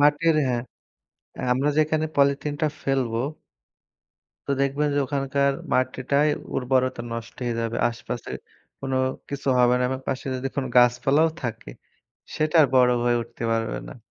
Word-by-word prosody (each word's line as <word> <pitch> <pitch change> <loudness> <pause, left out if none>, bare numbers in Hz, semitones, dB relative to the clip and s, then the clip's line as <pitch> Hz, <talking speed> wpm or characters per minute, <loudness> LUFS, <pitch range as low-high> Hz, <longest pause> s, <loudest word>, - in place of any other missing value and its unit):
মাটির 150 +3 +4
হ্যাঁ, 120 -2 0 0.9
আমরা 135 +4 +1
যেখানে 155 0 +2
পলিথিনটা 145 +2 +2 0.2
ফেলবো 125 -4 0 1.3
তো - - +2
দেখবেন 140 +2 +1
যে 145 - +1
ওখানকার 140 0 +1 0.2
মাটিটায় 130 +3 +1 0.3
উর্বরতা 130 -1 +1
নষ্ট 115 0 -6
হয়ে 120 -1 -1
যাবে, 115 +1 -2
আশেপাশে 120 0 -6 0.5
কোনো 135 -1 -2 0.3
কিছু 140 -1 -4
হবে 125 0 +5
না, - - 0
এবং 130 0 -3
পাশে 130 - -2
যদি 130 - -3
দেখুন 135 0 -3
গাছপালাও 135 +6 +4
থাকে 115 - -5 0.7
সেটা 155 +2 +1
আর - - +5
বড় 125 -1 +6
হয়ে 120 0 +3
উঠতে 115 0 -11
পারবে 115 - -1
না। - - -9
130 Hz, 140 wpm, -24 LUFS, 120-145 Hz, 1.3 s, বড়